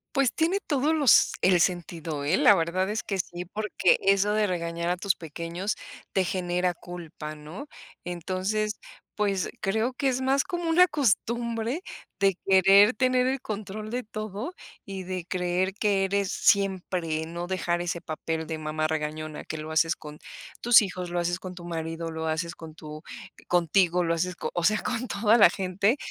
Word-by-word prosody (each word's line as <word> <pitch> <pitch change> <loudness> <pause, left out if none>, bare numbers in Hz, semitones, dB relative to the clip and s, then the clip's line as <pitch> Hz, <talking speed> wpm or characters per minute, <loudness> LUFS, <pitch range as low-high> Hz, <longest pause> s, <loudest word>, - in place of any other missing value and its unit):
Pues 275 -2 +4
tiene 340 +5 +1
todos 295 +2 +1
los 285 -8 +5
el 180 -1 +4
sentido, 165 -4 -1
¿eh? 155 +6 +2
La 205 - +7
verdad 185 +3 0
es 215 +1 -2
que 195 -2 -3
sí, 175 0 -4
porque 205 -1 +1
eso 195 +1 +3
de 210 0 +2
regañar 170 -2 -3
a 180 - +2
tus 190 +1 +1
pequeños, 170 +5 -4 0.4
te 190 - +3
genera 180 0 0
culpa, 165 -3 -8
¿no? 155 - -9 0.4
Entonces, 190 +5 -2 0.4
pues, 200 -3 0
creo, 220 +6 0
que 270 +1 0
es 255 0 -1
más 270 +1 +2
como 345 -2 -3
una 360 +2 +6
costumbre 235 - 0 0.4
de 195 -2 +3
querer 195 +3 +6
tener 255 -1 +2
el 265 +1 0
control 215 -1 -5
de 250 +2 -3
todo, 215 - -5 0.3
y 195 -1 -6
de 185 -1 -5
creer 180 +1 -1
que 205 -1 +1
eres 200 0 0
siempre, 180 -5 +1
no 170 +2 -5
dejar 175 -2 -1
ese 175 -1 -3
papel 160 +1 -4
de 160 - -3
mamá 155 0 -2
regañona, 155 0 -4
que 160 - -5
lo 155 +1 -6
haces, 160 +1 +2
con 150 0 -11 0.4
tus 240 0 +7
hijos, 180 -3 -4
lo 175 - 0
haces 175 +1 -1
con 185 -1 -8
tu 175 - -10
marido, 165 -1 -4
lo 160 0 -4
haces 165 +2 -2
con 160 -1 -10
tu 155 -1 -9 0.5
contigo, 175 +1 +3
lo 165 -1 +1
haces 180 +2 -2 0.2
o 175 - -1
sea, 215 +2 +3
con 250 0 -2
toda 215 +2 +3
la 205 - +8
gente, 195 +7 0
185 Hz, 175 wpm, -27 LUFS, 170-215 Hz, 0.5 s, la